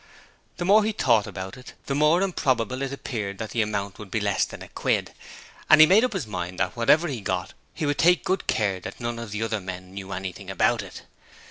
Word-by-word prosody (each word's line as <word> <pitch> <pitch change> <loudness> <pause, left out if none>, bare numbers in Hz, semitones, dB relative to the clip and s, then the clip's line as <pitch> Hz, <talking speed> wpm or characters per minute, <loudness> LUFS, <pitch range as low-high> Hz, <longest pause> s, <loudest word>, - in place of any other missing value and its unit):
The 175 - -3
more 210 +3 +6
he 220 +1 0
thought 115 - +2
about 95 +4 -7
it 125 - -12
the 140 - -2
more 150 +6 +3
improbable 130 - 0
it 135 -1 -2
appeared 105 -8 -4
that 110 -1 -6
the 115 - +1
amount 100 -2 -3
would 105 -2 -9
be 110 - -1
less 100 -1 +1
than - - -10
a - - -10
quid, - - -1 0.6
and 155 - +8
he 155 - +11
made 195 +8 +5
up 255 - 0
his 185 - -2
mind 90 -3 -5
that - - -1
whatever 150 +8 +4
he 130 -8 -4
got 95 -1 -3 0.2
he 160 - -2
would 145 0 -1
take 175 +2 +4
good 190 -1 -1
care 100 -3 +1
that - - -8
none 120 -1 -3
of 115 -2 -6
the 105 +2 -3
other 110 -2 -2
men 90 0 -8
knew 100 0 -7
anything 95 -1 -6
about - - +2
it. - - -10
115 Hz, 235 wpm, -25 LUFS, 100-150 Hz, 0.6 s, he